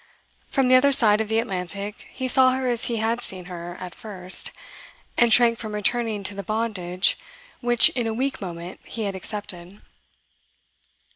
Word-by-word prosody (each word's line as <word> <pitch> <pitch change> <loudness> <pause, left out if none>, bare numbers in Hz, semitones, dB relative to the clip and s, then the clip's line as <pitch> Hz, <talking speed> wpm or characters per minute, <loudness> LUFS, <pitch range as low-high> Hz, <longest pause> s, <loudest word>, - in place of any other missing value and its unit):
From 270 -2 +1
the 255 - +3
other 270 +2 +5
side 220 -6 +3
of 220 - -4
the 220 - 0
Atlantic 200 -1 -4
he 260 0 -4
saw 255 0 +5
her 260 0 -2
as 245 +1 +2
he 235 -2 -2
had 225 +2 -1
seen 185 -2 -4
her 175 0 -8
at 180 -2 -8
first, 185 -3 +2 0.7
and 235 -1 +3
shrank 230 0 +5
from 215 -2 -6
returning 215 0 -1
to 195 - -2
the 200 - -6
bondage 200 -3 -1 0.4
which 240 -1 +6
in 245 -3 -3
a - - -2
weak 265 +1 -2
moment 175 -1 -8
he 225 - -6
had 200 -2 -3
accepted. 190 -1 -8
215 Hz, 170 wpm, -23 LUFS, 190-240 Hz, 0.7 s, which